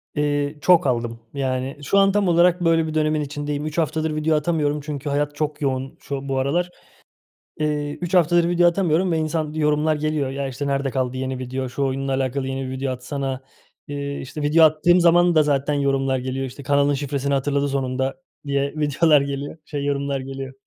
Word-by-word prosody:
Eee, 145 Hz, 0 st, 0 dB
çok 165 Hz, -1 st, +5 dB
aldım. 115 Hz, -2 st, -1 dB
Yani 130 Hz, 0 st, -2 dB
şu 200 Hz, +8 st, +1 dB
an 195 Hz, 0 st, +5 dB
tam 205 Hz, -1 st, +1 dB
olarak 175 Hz, +1 st, +4 dB
böyle 165 Hz, -1 st, +3 dB
bir 155 Hz, -, -4 dB
dönemin 155 Hz, -1 st, +1 dB
içindeyim. 145 Hz, 0 st, -4 dB
3 155 Hz, +1 st, -5 dB
haftadır 160 Hz, -1 st, 0 dB
video 155 Hz, +1 st, +1 dB
atamıyorum 150 Hz, -2 st, 0 dB
çünkü 145 Hz, -1 st, -5 dB
hayat 145 Hz, +1 st, -1 dB
çok 150 Hz, 0 st, -3 dB
yoğun 135 Hz, -1 st, -2 dB
şu, 140 Hz, -1 st, -5 dB
bu 135 Hz, -, 0 dB
aralar. 170 Hz, +7 st, 0 dB, 0.9 s
Eee, 150 Hz, -1 st, -1 dB
3 175 Hz, 0 st, -4 dB
haftadır 175 Hz, -1 st, +4 dB
video 175 Hz, 0 st, +4 dB
atamıyorum 175 Hz, 0 st, +2 dB
ve 165 Hz, -, +1 dB
insan 155 Hz, -1 st, -2 dB
yorumlar 150 Hz, 0 st, +1 dB
geliyor. 150 Hz, -2 st, -1 dB
"Ya, 135 Hz, 0 st, -3 dB
işte, 135 Hz, +2 st, -4 dB
nerede 140 Hz, 0 st, 0 dB
kaldı 130 Hz, -1 st, -2 dB
yeni 130 Hz, 0 st, -3 dB
video, 130 Hz, 0 st, -4 dB
şu 140 Hz, +2 st, -2 dB
oyunla 135 Hz, 0 st, -1 dB
alakalı 130 Hz, 0 st, -1 dB
yeni 135 Hz, 0 st, -3 dB
bir -, -, -5 dB
video 130 Hz, 0 st, -2 dB
atsana." 130 Hz, +1 st, -4 dB, 0.5 s
Eee, 140 Hz, 0 st, -4 dB
işte 140 Hz, +3 st, -7 dB
video 150 Hz, +3 st, +4 dB
attığım 155 Hz, +3 st, +4 dB
zaman 175 Hz, 0 st, +5 dB
da 155 Hz, -, +6 dB
zaten 145 Hz, 0 st, 0 dB
yorumlar 135 Hz, -2 st, +1 dB
geliyor, 130 Hz, +1 st, -3 dB
işte 130 Hz, +2 st, -9 dB
"Kanalın 140 Hz, +1 st, +2 dB
şifresini 140 Hz, 0 st, -2 dB
hatırladı 140 Hz, +1 st, +1 dB
sonunda." 130 Hz, 0 st, -1 dB, 0.3 s
diye 140 Hz, 0 st, -1 dB
videolar 150 Hz, 0 st, +3 dB
geliyor, 140 Hz, +2 st, -4 dB
şey 145 Hz, -2 st, -4 dB
yorumlar 140 Hz, -1 st, -1 dB
geliyor. 135 Hz, 0 st, -7 dB
145 Hz, 190 wpm, -22 LUFS, 135-155 Hz, 0.9 s, da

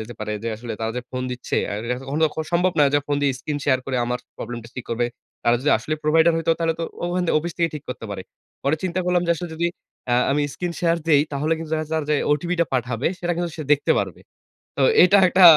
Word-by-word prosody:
যেতে 110 Hz, +2 st, -7 dB
পারে 105 Hz, 0 st, -3 dB
যে 115 Hz, -, -2 dB
আসলে 115 Hz, +1 st, -6 dB
তারা 110 Hz, 0 st, -1 dB
যে 125 Hz, -, -2 dB
ফোন 130 Hz, 0 st, -3 dB
দিচ্ছে 125 Hz, 0 st, -3 dB
আর 100 Hz, -, -2 dB
এটাতো 125 Hz, +2 st, -3 dB
কখনো 150 Hz, +3 st, 0 dB
তো -, -, +4 dB, 0.2 s
সম্ভব 180 Hz, +1 st, +3 dB
না 145 Hz, -, +7 dB
যে -, -, +6 dB
ফোন 145 Hz, -, 0 dB
দিয়ে 140 Hz, -, +3 dB
স্ক্রিন 145 Hz, +2 st, -3 dB
শেয়ার 130 Hz, -2 st, +3 dB
করে 130 Hz, -2 st, -1 dB
আমার 125 Hz, +1 st, -1 dB, 0.2 s
প্রবলেম 120 Hz, +1 st, -5 dB
টা -, -, -10 dB
ঠিক 125 Hz, -, -5 dB
করবে। 120 Hz, +1 st, +1 dB, 0.4 s
তারা 120 Hz, 0 st, +4 dB
যদি 150 Hz, -, +2 dB
আসলে 155 Hz, -, -2 dB
প্রোভাইডার 160 Hz, +2 st, +4 dB
হইতো 165 Hz, 0 st, 0 dB
তাহলে 165 Hz, -1 st, +1 dB
তো -, -, 0 dB, 0.2 s
ওখানে 175 Hz, 0 st, 0 dB
অফিস 170 Hz, +2 st, -4 dB
থেকেই 170 Hz, -1 st, +1 dB
ঠিক 150 Hz, -, -7 dB
করতে 125 Hz, -, -5 dB
পারে। 95 Hz, -2 st, -5 dB, 0.4 s
পরে 140 Hz, +3 st, +2 dB
চিন্তা 185 Hz, 0 st, 0 dB
করলাম 180 Hz, -1 st, +2 dB
যে 170 Hz, -, +1 dB
আসলে 175 Hz, +2 st, -5 dB
যদি 170 Hz, +2 st, 0 dB, 0.5 s
আ -, -, +5 dB, 0.2 s
আমি 145 Hz, +1 st, +2 dB
স্ক্রিন 175 Hz, -1 st, -3 dB
শেয়ার 170 Hz, -1 st, +3 dB
দেই 145 Hz, -3 st, +6 dB
তাহলে 150 Hz, +3 st, 0 dB
কিন্তু 160 Hz, -1 st, -7 dB
দেখা 155 Hz, 0 st, -2 dB
যাবে 155 Hz, -2 st, 0 dB
যে -, -, +4 dB, 0.2 s
ওটিপি 170 Hz, +4 st, 0 dB
টা -, -, +5 dB
পাঠাবে 125 Hz, 0 st, -1 dB
সেটা 175 Hz, -1 st, -1 dB
কিন্তু 175 Hz, 0 st, -1 dB
সে -, -, -2 dB
দেখতে 145 Hz, -, +3 dB
পারবে। -, -, -3 dB, 0.6 s
তো -, -, +1 dB, 0.2 s
এটা 195 Hz, +3 st, +6 dB
একটা 185 Hz, +1 st, +4 dB
150 Hz, 250 wpm, -23 LUFS, 125-170 Hz, 0.6 s, না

